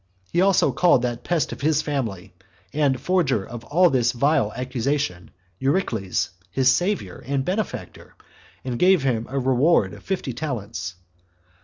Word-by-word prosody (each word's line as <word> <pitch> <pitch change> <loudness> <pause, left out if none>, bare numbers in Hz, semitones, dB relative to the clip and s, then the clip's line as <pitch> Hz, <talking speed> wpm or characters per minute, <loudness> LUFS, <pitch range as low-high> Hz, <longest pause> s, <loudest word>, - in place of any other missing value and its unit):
He 175 - +3
also 190 -7 +4
called 135 -1 +3
that 120 -1 -2
pest 170 -5 0
of - - -7
his 155 +1 +2
family, 110 -11 -3 0.4
and 140 -4 +1
forger 160 - +1
of 120 +1 -8
all 175 +4 +4
this 120 -2 +2
vile 125 -4 +2
accusation, 125 -6 -2 0.3
Eurycles, 115 - 0 0.2
his 130 0 +3
savior 180 - -2
and 135 -1 -1
benefactor, 195 +2 -4 0.5
and 125 -2 -3
gave 185 -4 +4
him 120 -4 0
a 135 - -3
reward 130 +5 +3
of - - -11
fifty 185 -9 -3
talents. 115 - -4
135 Hz, 145 wpm, -23 LUFS, 120-160 Hz, 0.5 s, also